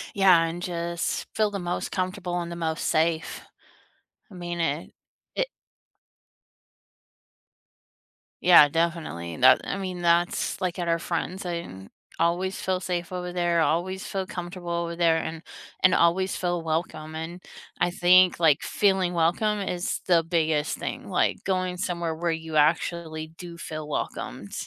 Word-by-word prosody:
Yeah, 185 -4 +6
and 165 +1 -4
just 170 -1 -2
feel 215 -1 +2
the 200 - -3
most 175 0 -3
comfortable 185 -1 -2
and 170 0 -5
the - - -5
most 160 -1 -2
safe. 160 0 0 0.9
I - - -15
mean 175 -1 -5
it 160 -1 -1 0.4
it - - 0 2.9
Yeah, 170 -5 +8
definitely, 160 - -2
and 125 - -7
that 130 0 +8
I - - -3
mean, 185 -2 -4
that's, 170 +3 +1
like, 180 -1 -2
at 175 - -2
our 165 - +2
friends 180 +3 -3
I 175 - -2
didn't 95 - -11 0.3
always 175 +3 0
feel 185 -1 0
safe 175 -2 -3
over 180 -1 -4
there, 175 -1 +1
always 185 +4 0
feel 190 -1 -3
comfortable 175 -1 -7
over 170 0 -2
there, 165 -1 +3
and 160 0 -4 0.4
and 185 -1 +6
always 185 +3 +2
feel 175 -2 -1
welcome, 155 -1 -3
and 165 +3 -6 0.4
I 175 - +3
think, 180 0 +5
like, 155 -4 +4
feeling 190 -3 +2
welcome 175 +6 +1
is 180 0 -2
the 170 -3 +4
biggest 160 -2 0
thing, - - -5
like - - +1
going 185 -1 -1
somewhere 170 -3 -2
where 170 +1 -1
you 160 -1 -5
actually 155 +1 +1
do 170 +1 -10
feel 155 -2 -6
welcomed. - - -4
170 Hz, 150 wpm, -26 LUFS, 165-180 Hz, 2.9 s, Yeah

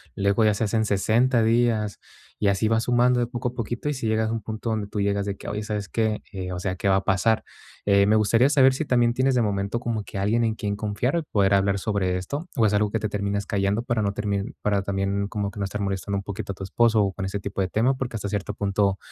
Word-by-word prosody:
luego 100 +3 +2
ya 105 -1 +3
se 115 - -1
hacen 110 +1 +1
60 115 +5 +2
días, 115 -2 +1 0.4
y 105 - +1
así 100 +2 +2
va 115 0 +2
sumando 125 +1 +3
de 120 - 0
poco 120 0 -3
a - - -12
poquito. 120 +3 -4
Y 150 - +1
si 125 -4 -3
llegas 110 0 +1
a - - -2
un 115 - -3
punto 110 +2 -4
donde 110 -2 -2
tú 105 - -4
llegas 100 0 0
de 100 -1 -3
que: - - -10
"Oye, 105 +1 -3
¿sabes 105 -1 -4
qué?, 110 -2 -1
eh, 95 -2 -5
o 90 - -4
sea, 95 0 -2
¿qué 100 - -2
va 95 - +4
a 95 - +1
pasar?" 110 +3 +2 0.4
Eh, 100 -1 +4
me 105 - +4
gustaría 115 +4 +4
saber 135 -3 +5
si 155 - -2
también 120 -2 +3
tienes 130 +1 +2
de 120 - +3
momento 100 +2 -1
como 115 -3 -2
que 100 - -8
alguien 110 +4 +1
en 110 -1 0
quien 100 -1 -2
confiar, 105 +9 -1
o 165 - -1
poder 100 -7 +2
hablar 100 0 +2
sobre 95 -3 0
esto, 140 - -5
o 115 - +3
es 105 - +2
algo 105 0 +2
que 115 - 0
te 110 - -2
terminas 100 0 -2
callando 100 +3 0
para 120 -3 0
no 100 -1 0
termin 100 +4 -2
para 100 -1 +1
también 100 0 -1
como 100 -1 -3
que 105 - -10
no 100 - 0
estar 100 +1 -4
molestando 100 0 -2
un 100 - -4
poquito 100 0 -5
a - - -16
tu 95 - -8
esposo, 115 +2 +3
o 100 - 0
con 95 - -4
ese 95 +2 -3
tipo 95 - -4
de 95 - +1
tema, 120 +7 +1
porque 130 -2 -4
hasta 100 -2 -3
cierto 100 -1 -3
punto, 100 -1 +1
105 Hz, 275 wpm, -24 LUFS, 100-115 Hz, 0.4 s, saber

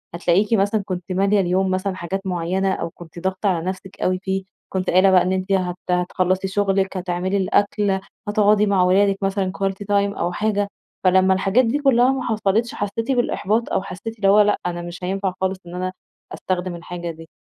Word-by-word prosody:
هتلاقيكِ 185 +5 +2
مثلًا 205 0 +2
كنتِ 185 -2 -5
ماليَة 195 +2 +2
اليوم 185 +1 +1
مثلًا 185 +1 -1
حاجات 190 +3 -4
معيّنة، 185 +2 0
أو - - -3
كنتِ 170 0 -12
ضاغطة 190 +3 -1
على 170 -3 -1
نفسك 190 +1 -6
أوي 185 0 +1
فيه، 190 0 -1 0.3
كنتِ 185 -1 -1
قايلة 185 +2 +5
بقى 185 -1 +6
إن 185 - 0
أنتِ 190 +1 -2
هت 180 -2 0 0.2
هتخلصي 185 +1 0
شغلِك، 195 -1 0
هتعملي 180 +2 -1
الأكل، 200 +1 +1 0.3
هتقعدي 210 0 +3
مع 195 -3 +3
ولادِك 195 +2 +3
مثلًا 195 -1 0
quality 195 +1 -2
time 200 0 +1
أو 175 +1 0
حاجة، 205 +1 0 0.4
فلما 190 0 +4
الحاجات 195 +6 +2
دي 245 +6 0
كلّها 260 -3 +4
ما 265 -1 -2
حصلتش 220 0 0
حسّيتِ 215 +5 -2
بالإحباط 235 -3 0
أو - - +2
حسّيتِ 200 +4 -7
اللي 200 -2 +1
هو 210 +2 +7
لأ، 210 0 +3
أنا 175 -1 -2
مش 175 +1 -8
هينفع 190 +1 -1
خالص 190 0 -1
إن 175 - -8
أنا 185 0 -2 0.4
أستخدم 185 -1 -3
الحاجة 175 0 -6
دي. 165 0 -13
190 Hz, 190 wpm, -21 LUFS, 185-205 Hz, 0.4 s, هو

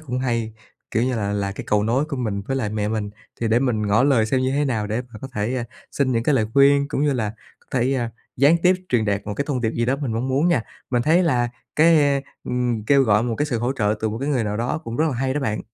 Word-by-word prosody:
cũng 125 -5 -4
hay, 115 -3 -1 0.4
kiểu 115 - +1
như 125 0 0
là, 100 -2 -1
là 100 -1 -1
cái - - -7
cầu 105 0 +2
nối 120 +6 +1
của 150 -2 -5
mình 105 -5 -2
với 135 - -1
lại 115 -6 -1
mẹ 105 0 -2
mình 105 -2 -2 0.3
thì 115 - 0
để 115 +2 +4
mình 115 -5 0
ngỏ 100 +4 +3
lời 130 -5 +3
xem 130 +4 +1
như 130 0 +1
thế 145 +2 +1
nào 110 -6 -1
để 110 +3 -2
mà 110 - -9
có 135 - -5
thể, 105 +4 -1
à, 120 - -2 0.3
xin 130 -3 +1
những 115 -1 +1
cái 145 - +2
lời 110 -4 +2
khuyên, 140 0 +5
cũng 145 - -1
như 145 -1 +2
là 110 -4 -2 0.3
có - - -30
thể, 130 +3 +1
à, 120 -3 -1 0.3
gián 145 +6 +5
tiếp 185 +1 +5
truyền 120 -3 +2
đạt 100 -1 0
một 105 - -3
cái 140 - -2
thông 130 -4 -1
điệp 110 -2 0
gì 115 - -1
đó 130 +3 +1
mình 135 -6 -3
mong 120 +4 -2
muốn 140 +6 +2
nha. 130 -10 +2 0.3
Mình 120 -2 +1
thấy 165 +7 +4
là 120 -7 +1 0.3
cái, 160 0 +6
a, 140 -1 +2 0.2
ừm, 120 -3 -1
kêu 140 +2 +4
gọi 105 -3 +3
một 120 -2 -1
cái 145 - +1
sự 120 -5 -1
hỗ 120 +3 0
trợ 105 -5 0
từ 110 - 0
một 110 +2 -4
cái 140 - -2
người 130 -6 +1
nào 105 0 -2
đó 120 +6 -1
cũng 115 +1 -5
rất 155 - +2
là 135 - -2
hay 130 +2 -1
đó 150 - -1
bạn. 110 -6 -2
125 Hz, 300 wpm, -22 LUFS, 110-140 Hz, 0.4 s, cái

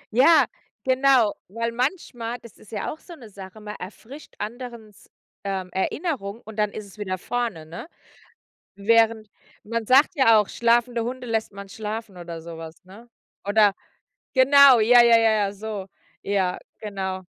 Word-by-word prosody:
Ja, 285 +1 +6 0.4
genau, 260 -4 +3
weil 230 +4 -3
manchmal 245 -3 -3
das 235 - -14
ist 215 - -18
ja 205 -3 -3
auch 315 - -14
so 345 - -12
'ne 235 -7 -13
Sache, 190 +2 -11
man 210 0 -7
erfrischt 235 +10 -11
anderen 235 0 -7
s 205 - -22 0.3
ähm, 190 -2 -4
Erinnerung 225 - -3
und 220 0 -11
dann 210 -1 +1
ist 215 - -7
es 200 +2 -16
wieder 185 -2 -3
vorne, 225 -7 -3
ne? 170 - -9 0.9
Während 220 +1 +2 0.3
man 230 0 -4
sagt 275 +6 +5
ja 230 -5 +6
auch, 210 - 0
schlafende 235 0 +1
Hunde 250 +1 -5
lässt 220 -2 -2
man 200 -1 -10
schlafen 215 -2 -6
oder 170 -2 -8
so 165 -1 -9
was, 160 +2 -11
ne? 215 +6 -15 0.4
Oder 205 -1 +4 0.6
genau, 270 -1 +7
ja, 240 +2 +7
ja, 235 -1 +6
ja, 225 -1 +4
ja, 205 -2 +1
so. 205 -2 -6 0.4
Ja, 190 -3 0 0.2
genau. 190 -3 -5
220 Hz, 160 wpm, -24 LUFS, 200-240 Hz, 0.9 s, genau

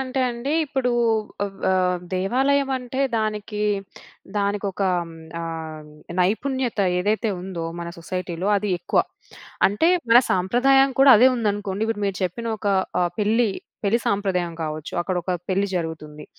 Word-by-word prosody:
అంటే 265 0 -2
అండి 240 +4 -3
ఇప్పుడు 265 -3 -1 0.5
ఆహ్, 200 -1 -6
వ - - +3 0.5
దేవాలయం 270 +9 +1
అంటే 250 +1 -5 0.2
దానికి 210 -1 -2 0.8
దానికొక 200 -1 -1 0.2
హ్మ్, 165 - -11 0.3
ఆహ్, 160 -2 -6 0.3
నైపుణ్యత 245 +6 0 0.2
ఏదైతే 215 +4 0
ఉందో 180 -2 -5 0.2
మన 170 - -5
సొసైటీలో 180 +1 -3
అది 205 0 -1
ఎక్కువ. 175 - +2 0.7
అంటే, 210 +12 +2 0.2
మన 235 - +9
సాంప్రదాయం 255 +9 +4
కూడా 270 0 +8
అదే 250 +5 +7
ఉందనుకోండి. 205 -3 -1
ఇప్పుడు 225 -2 -2
మీరు 195 -1 -2
చెప్పిన 210 +6 -4
ఒక 205 - -2 0.3
ఆహ్, 175 0 0
పెళ్ళి. 220 +2 +2 0.3
పెళ్లి 210 +4 +3
సాంప్రదాయం 190 -4 0
కావచ్చు, 155 0 -5
అక్కడ 180 +1 -2
ఒక 185 - -4 0.2
పెళ్ళి 195 +1 +1
జరుగుతుంది. 155 -3 -5
205 Hz, 135 wpm, -23 LUFS, 180-235 Hz, 0.8 s, మన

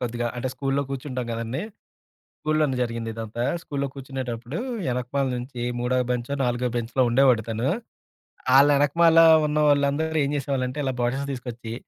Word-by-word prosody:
కొద్దిగా 120 -1 -2
అంటే 130 +2 -2
స్కూలులో 140 0 0
కూర్చుంటాం 130 -2 -4
గదండీ! 115 +6 -3 0.8
స్కూలులోనే 155 -4 +1
జరిగింది 115 -1 -4
ఇదంతా. 115 +1 -4 0.2
స్కూలులో 140 -1 -3
కూర్చునేటప్పుడు 130 0 -5 0.3
యెనకమాల 125 +2 -1
నుంచి 125 0 -6 0.2
మూడో 125 +1 +1
బెంచొ, 125 +3 -2
నాలుగో 125 0 0
బెంచ్‌లో 120 +3 0
ఉండేవాడు 125 -2 +4
తను. 115 +4 -1 0.9
ఆళ్ళ 140 - +7
యెనకమాల 165 +4 +4 0.3
ఉన్న 150 +1 -1
వాళ్ళందరూ 145 +3 +1
ఏం - - -2
జేసేవాళ్ళంటే 135 -1 -2
ఇలా 130 - 0
బాటిల్స్ 135 +4 -1
తీసుకొచ్చి 120 -2 -7
130 Hz, 135 wpm, -24 LUFS, 120-140 Hz, 0.9 s, ఆళ్ళ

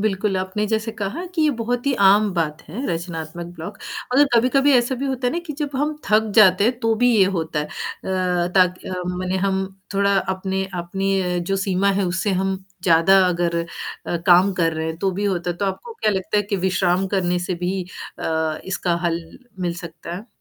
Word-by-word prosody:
बिल्कुल, 200 -1 0
आपने 190 +3 -1
जैसे 220 +1 -1
कहा 220 - -4
कि 325 - +2
ये 305 - +4
बहुत 245 +3 -2
ही 280 - +3
आम 205 +1 +4
बात 160 -2 -1
है, 220 - -5
रचनात्मक 165 0 -4
ब्लॉक 170 +6 -7 0.4
और 285 - +7
कभी-कभी 270 +4 +4
ऐसा 245 +1 +3
भी - - 0
होता 260 -2 -1
है - - +1
ना 340 - -1
कि 305 - -4
जब 290 -1 -1
हम 300 +2 0
थक 215 +1 +3
जाते 200 -2 +6
हैं 240 +2 +1
तो 225 -1 +2
भी 245 - +6
ये 195 - +6
होता 160 -1 -2
है - - -2
अ, - - -16 0.9
ताकि 185 -1 +2 0.3
मने 185 +1 -1
हम 190 0 0 0.3
थोड़ा 200 0 +3 0.2
अपने 190 0 -2
अपनी 195 +3 -1
अ, 180 -1 -1
जो 175 +3 -1
सीमा 195 +1 +2
है - - +1
उससे 185 +4 -1
हम 195 0 0 0.3
ज़्यादा 170 +2 +5
अगर 170 -1 0
अ, 170 - -5 0.4
वो 175 - 0
काम 180 +2 +6
कर 165 -1 +2
रहे 160 0 -3
हैं 160 - -3
तो 195 +2 +1
भी 205 - -1
होता 180 -3 0
है 175 - -4
तो 200 - -2
आपको 195 - -4
क्या 215 - +1
लगता 190 0 -1
है 205 - +3
कि 200 0 -2
अ, - - -3
विश्राम 185 0 +1
करने 180 -2 +1
से 185 - 0
भी 185 +1 -1 0.4
अ, 160 -1 -1
इसका 185 -2 -1
हल 170 0 0 0.4
मिल 175 -1 -1
सकता 170 0 -8
है? 205 +5 -9
190 Hz, 215 wpm, -22 LUFS, 175-215 Hz, 0.9 s, और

